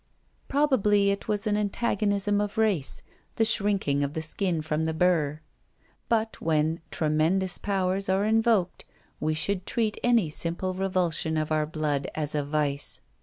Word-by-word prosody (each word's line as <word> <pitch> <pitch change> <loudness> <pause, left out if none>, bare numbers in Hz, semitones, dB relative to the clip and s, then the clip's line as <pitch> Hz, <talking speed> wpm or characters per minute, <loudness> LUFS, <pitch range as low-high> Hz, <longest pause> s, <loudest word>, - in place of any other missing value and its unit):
Probably 210 -9 +3
it 200 - -4
was 210 0 -1
an 210 -1 +1
antagonism 205 -1 0
of 210 0 -4
race, 205 -11 0 0.3
the 225 - +2
shrinking 200 -10 +1
of 140 +1 -3
the 160 - -2
skin 165 0 0
from 155 0 -1
the 160 0 -2
burr. 160 -4 +1 0.7
But 225 -1 0
when 160 +1 +1
Tremendous 160 +5 +1
Powers 195 -1 0
are 190 +2 +2
invoked, 220 -4 +2 0.4
we 155 0 0
should 185 +3 -1
treat 225 -3 0
any 230 -10 +3
simple 170 +4 -2
revulsion 180 -4 0
of 155 0 -2
our 155 -1 +1
blood 150 -3 -2
as 150 -1 -1
a 150 -1 0
vice. 145 -1 -2
185 Hz, 150 wpm, -27 LUFS, 155-205 Hz, 0.7 s, Probably